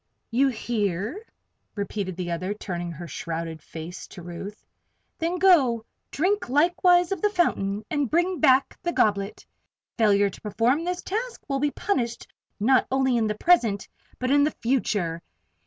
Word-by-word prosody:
"You 265 Hz, +4 st, +3 dB
hear?" 220 Hz, -, -2 dB, 0.5 s
repeated 200 Hz, -2 st, -3 dB
the 175 Hz, -2 st, -3 dB
other, 185 Hz, +4 st, -2 dB
turning 175 Hz, -4 st, -4 dB
her 170 Hz, +1 st, -8 dB
shrouded 165 Hz, -1 st, -5 dB
face 165 Hz, +3 st, -8 dB
to 175 Hz, -, -11 dB
Ruth. 180 Hz, +5 st, -8 dB, 0.5 s
"Then 335 Hz, +2 st, -1 dB
go, 275 Hz, -12 st, +4 dB, 0.2 s
drink 375 Hz, +1 st, 0 dB
likewise 350 Hz, +5 st, +4 dB
of 385 Hz, -4 st, -2 dB
the 420 Hz, -, +3 dB
fountain, 210 Hz, -, 0 dB
and 290 Hz, -5 st, -1 dB
bring 350 Hz, +2 st, +1 dB
back 265 Hz, -2 st, +4 dB
the 345 Hz, -, -2 dB
goblet. 200 Hz, -1 st, 0 dB, 0.5 s
Failure 205 Hz, -2 st, +4 dB
to -, -, -13 dB
perform 230 Hz, +8 st, +1 dB
this 360 Hz, 0 st, -3 dB
task 460 Hz, +5 st, -4 dB
will 275 Hz, -2 st, -1 dB
be 295 Hz, +1 st, +2 dB
punished 250 Hz, -, -2 dB, 0.3 s
not 255 Hz, +5 st, +3 dB
only 265 Hz, -1 st, +2 dB
in 225 Hz, -2 st, +2 dB
the 210 Hz, 0 st, -2 dB
present, 230 Hz, -, +3 dB, 0.3 s
but 255 Hz, +1 st, -1 dB
in 285 Hz, 0 st, +5 dB
the 300 Hz, -, 0 dB
future. 205 Hz, -9 st, 0 dB
235 Hz, 155 wpm, -25 LUFS, 200-315 Hz, 0.5 s, in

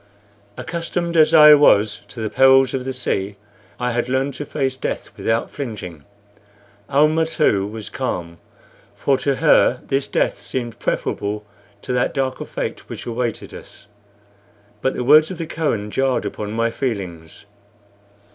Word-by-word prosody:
Accustomed 170 Hz, +1 st, -3 dB
as 155 Hz, -1 st, +5 dB
I 150 Hz, -2 st, +9 dB
was 110 Hz, -8 st, +4 dB
to 115 Hz, -, -8 dB
the 110 Hz, -, -2 dB
perils 135 Hz, -1 st, +5 dB
of 130 Hz, -1 st, -3 dB
the 130 Hz, -, -2 dB
sea, 105 Hz, -6 st, -2 dB, 0.4 s
I 125 Hz, 0 st, -1 dB
had 120 Hz, +1 st, -1 dB
learned 135 Hz, +2 st, 0 dB
to 145 Hz, +2 st, -7 dB
face 135 Hz, -3 st, -2 dB
death -, -, -5 dB
without 115 Hz, 0 st, -1 dB
flinching. 105 Hz, -, -7 dB, 0.9 s
Almah, 155 Hz, +3 st, +3 dB
too, 105 Hz, -12 st, +1 dB
was 110 Hz, 0 st, -8 dB
calm, 85 Hz, -10 st, -4 dB, 0.6 s
for 140 Hz, -, +1 dB
to 140 Hz, -1 st, 0 dB
her 130 Hz, -4 st, +4 dB
this 135 Hz, 0 st, -1 dB
death -, -, 0 dB
seemed 120 Hz, -3 st, -5 dB
preferable 105 Hz, +1 st, -2 dB, 0.4 s
to -, -, -3 dB
that 125 Hz, +3 st, 0 dB
darker 130 Hz, -1 st, -2 dB
fate -, -, -5 dB
which -, -, -7 dB
awaited 120 Hz, -1 st, -3 dB
us; -, -, -11 dB, 1.0 s
but 130 Hz, -, 0 dB
the -, -, -2 dB
words 155 Hz, +4 st, +6 dB
of 185 Hz, -, -6 dB
the 165 Hz, -, -4 dB
Kohen 115 Hz, -11 st, -2 dB
jarred 135 Hz, +1 st, 0 dB
upon 105 Hz, -1 st, -5 dB
my 115 Hz, +1 st, 0 dB
feelings. 95 Hz, -11 st, -5 dB
130 Hz, 150 wpm, -20 LUFS, 110-145 Hz, 1.0 s, I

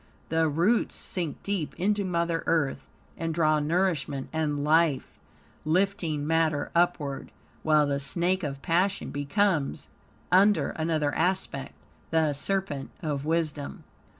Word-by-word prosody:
The 160 Hz, 0 st, +2 dB
roots 175 Hz, +10 st, +2 dB
sink 170 Hz, -5 st, -4 dB
deep 195 Hz, -7 st, -3 dB
into 205 Hz, +2 st, +1 dB
Mother 170 Hz, -2 st, 0 dB
Earth, 155 Hz, -5 st, 0 dB, 0.3 s
and 165 Hz, -1 st, -2 dB
draw 155 Hz, -2 st, +3 dB
nourishment 150 Hz, -4 st, 0 dB
and 150 Hz, -2 st, -1 dB
life, 155 Hz, -2 st, +2 dB, 0.4 s
lifting 165 Hz, -3 st, 0 dB
matter 160 Hz, -2 st, +1 dB
upward, 170 Hz, -5 st, 0 dB, 0.3 s
while 155 Hz, -1 st, +4 dB
the 140 Hz, -1 st, 0 dB
snake 175 Hz, +6 st, 0 dB
of 140 Hz, -4 st, -5 dB
passion 185 Hz, +4 st, +1 dB
becomes, 150 Hz, +2 st, 0 dB, 0.4 s
under 200 Hz, +3 st, +4 dB
another 155 Hz, -2 st, 0 dB
aspect, 170 Hz, -6 st, -1 dB, 0.3 s
the 160 Hz, -2 st, +2 dB
serpent 145 Hz, -3 st, -2 dB
of 145 Hz, -3 st, -2 dB
wisdom. 155 Hz, -3 st, -2 dB
160 Hz, 120 wpm, -27 LUFS, 145-180 Hz, 0.4 s, while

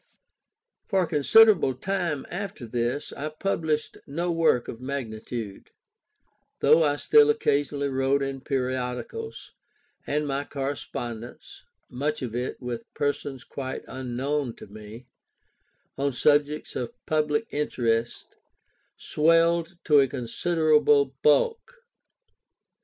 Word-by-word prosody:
For 190 Hz, -1 st, +2 dB
a -, -, -2 dB
considerable 155 Hz, -, +5 dB
time 170 Hz, -2 st, -2 dB
after 175 Hz, -7 st, -5 dB
this, 120 Hz, +4 st, -2 dB
I 150 Hz, +2 st, -4 dB
published 155 Hz, -2 st, -2 dB
no 170 Hz, +5 st, -2 dB
work 165 Hz, -7 st, +2 dB
of 115 Hz, -, -7 dB
magnitude; 115 Hz, -5 st, -5 dB, 0.9 s
though 155 Hz, +3 st, +5 dB
I 145 Hz, -1 st, +2 dB
still 440 Hz, -, +5 dB
occasionally 145 Hz, -, +1 dB
wrote 135 Hz, +1 st, +1 dB
in 135 Hz, -1 st, -4 dB
periodicals, 130 Hz, -, -4 dB, 0.6 s
and 150 Hz, +1 st, 0 dB
my 140 Hz, 0 st, -1 dB
correspondence 125 Hz, -4 st, -6 dB, 0.3 s
(much 145 Hz, +3 st, -3 dB
of 120 Hz, -3 st, -4 dB
it 125 Hz, +2 st, -3 dB
with 125 Hz, -2 st, -6 dB
persons 145 Hz, -3 st, -2 dB
quite 130 Hz, -1 st, -6 dB
unknown 130 Hz, +1 st, -3 dB
to -, -, -11 dB
me), 110 Hz, +4 st, -11 dB, 0.9 s
on 140 Hz, 0 st, 0 dB
subjects 145 Hz, +3 st, +1 dB
of 120 Hz, -, -4 dB
public 155 Hz, +5 st, +1 dB
interest, 120 Hz, -5 st, -1 dB, 0.7 s
swelled 165 Hz, +2 st, +2 dB
to 150 Hz, -2 st, +5 dB
a 135 Hz, -, +4 dB
considerable 150 Hz, +1 st, +2 dB
bulk. 455 Hz, -, +2 dB
140 Hz, 110 wpm, -26 LUFS, 125-155 Hz, 0.9 s, considerable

